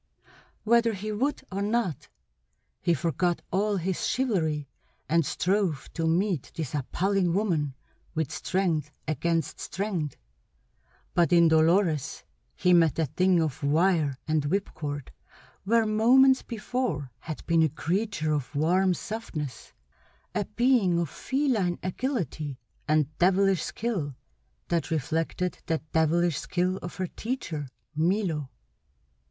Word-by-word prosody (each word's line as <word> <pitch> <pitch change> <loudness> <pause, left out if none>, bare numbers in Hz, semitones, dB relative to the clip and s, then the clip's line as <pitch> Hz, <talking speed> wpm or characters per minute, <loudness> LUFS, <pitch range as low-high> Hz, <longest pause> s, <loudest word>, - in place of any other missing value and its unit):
Whether 235 +1 +4
he 215 +2 -4
would 265 +8 -1
or 195 +1 -2
not, 205 - -1 0.7
he 170 -1 +2
forgot 170 +3 0
all 205 +2 +1
his 185 +1 -1
chivalry, 160 - 0 0.4
and 165 +1 +3
strove 180 -1 0
to 165 -1 -1
meet 175 -2 0
this 155 -6 -4
appalling 180 +6 0
woman 160 -10 0 0.4
with 160 -2 -1
strength 165 -5 0 0.2
against 160 0 -1
strength; 180 -6 -3 1.0
but 175 0 +3
in 170 -1 +6
Dolores 160 -1 +2 0.3
he 180 - +3
met 165 -5 +4
a 165 - +2
thing 180 +5 +2
of 155 -2 -1
wire 155 -2 +2
and 155 -2 +1
whipcord 145 -5 -3 0.5
where 230 +2 +3
moments 255 +5 +5
before 215 - -3
had 155 +4 -7
been 165 -1 +3
a 160 - +4
creature 175 +1 -1
of 145 -1 -2
warm 180 +5 +3
softnesses; 155 - -6 0.6
a 205 - 0
being 240 -8 +3
of 170 -4 -1
feline 250 -11 0
agility, 180 - -2 0.3
and 155 -1 +2
devilish 190 0 +4
skill 185 - -3 0.5
that 170 -2 0
reflected 165 +3 -1
the 165 - +1
devilish 160 0 +2
skill 185 +1 0
of 175 - -7
her 185 - -2
teacher, 170 - -4 0.3
Milo. 165 -3 0
175 Hz, 120 wpm, -27 LUFS, 155-200 Hz, 1.0 s, in